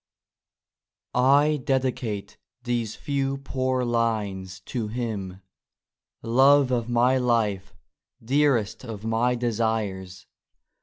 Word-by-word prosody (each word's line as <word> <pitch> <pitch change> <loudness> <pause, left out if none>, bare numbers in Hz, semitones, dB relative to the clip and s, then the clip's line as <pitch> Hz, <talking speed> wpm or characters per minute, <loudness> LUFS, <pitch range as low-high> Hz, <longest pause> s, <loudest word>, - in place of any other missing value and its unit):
T 140 +4 +4
DEDICATE 130 -6 -2 0.2
these 120 -3 -2
few 135 -1 -2
poor 130 -2 -1
lines 105 -6 -1
to 115 +2 -4
Him,— 110 -4 -3
^ 95 - -18 0.8
Love 135 +3 +4
of 120 -1 -1
my 125 +2 +3
Life 110 -6 0 0.4
1 - - -23
Dearest 130 -5 +1
of 110 -3 -7
my 115 +2 +1
desires 105 -6 -2
120 Hz, 100 wpm, -25 LUFS, 105-130 Hz, 0.8 s, T